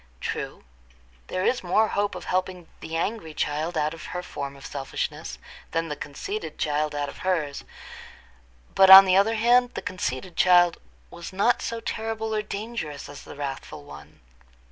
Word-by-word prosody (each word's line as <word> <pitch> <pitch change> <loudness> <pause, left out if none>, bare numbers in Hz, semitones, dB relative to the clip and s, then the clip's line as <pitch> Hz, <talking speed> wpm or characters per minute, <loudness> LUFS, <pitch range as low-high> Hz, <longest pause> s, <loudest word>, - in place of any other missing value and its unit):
True, - - -5 0.6
there 185 0 -2
is 255 - +2
more 215 +5 +3
hope 205 0 -1
of - - -7
helping 185 -2 -2
the 160 - -6
angry 165 -2 -3
child 155 +4 -1
out 155 +1 0
of 165 - -10
her 180 - -4
form 140 -5 -6
of 135 - -13
selfishness 135 -2 -4 0.4
than 165 0 -1
the 150 - -3
conceited 390 - -6
child 150 0 -1
out 145 0 -1
of - - -10
hers; 165 -7 -1 1.1
but 190 0 +6
on 190 +1 +13
the 185 -1 +3
other 205 +4 +4
hand, 245 +2 +3
the - - -3
conceited 170 -1 -4
child 175 -2 +5 0.3
was 170 +2 -8
not 200 +6 +2
so 230 0 -3
terrible 220 0 -3
or 215 - +1
dangerous 200 - -5
as 145 - -10
the - - -11
wrathful 135 - -6
one. 70 -2 -13
175 Hz, 165 wpm, -25 LUFS, 150-210 Hz, 1.1 s, on